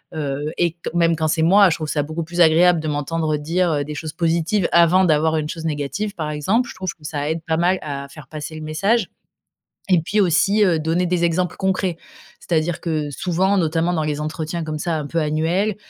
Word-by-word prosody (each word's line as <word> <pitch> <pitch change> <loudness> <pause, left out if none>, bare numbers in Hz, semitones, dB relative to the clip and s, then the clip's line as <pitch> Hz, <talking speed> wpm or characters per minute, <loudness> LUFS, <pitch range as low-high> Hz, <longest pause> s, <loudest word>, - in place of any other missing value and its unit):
Heu, 145 0 -3
et 175 -1 +2
q 165 - -32 0.2
même 170 -1 +3
quand 160 0 0
c'est 160 +1 0
moi, 195 +3 +6
je 160 - 0
trouve 155 -2 -5
ça 150 - 0
beaucoup 155 +3 -4
plus 170 +2 -6
agréable 170 +1 +5
de 155 - -4
m'entendre 155 +1 -1
dire, 170 +5 0
heu, 145 -1 0
des 150 +1 -7
choses 155 +1 -6
positives 170 +3 0
avant 170 +2 +5
d'avoir 160 -2 +2
une 155 -1 -2
chose 165 0 -6
négative, 160 +8 -3
par 155 -4 -3
exemple. 200 - 0
Je - - -9
trouve 185 -2 -4
que 155 - -25
ça 150 -1 -3
aide 160 +1 -2
pas 160 -1 0
mal 180 +2 +2
à 140 -2 -5
faire 140 -1 -13
passer 155 +2 -7
le 155 - -7
message. 170 +10 0 0.8
Et 185 -3 +4
puis, 205 +6 -1
aussi, 200 +3 +3
heu, 175 -5 +2
donner 165 +3 0
des 175 -1 +1
exemples 175 +1 -1
concrets. 190 -2 -1 0.4
C'est-à-dire 160 0 -1
que 155 -3 -2
souvent, 185 +6 0
notamment 165 0 +1
dans 160 - 0
les 150 -1 -2
entretiens 160 +2 -4
comme 155 -1 -4
ça, 165 +1 -1
un 150 - -4
peu 165 +4 -2
annuels, 165 +7 0
165 Hz, 225 wpm, -21 LUFS, 155-180 Hz, 0.8 s, moi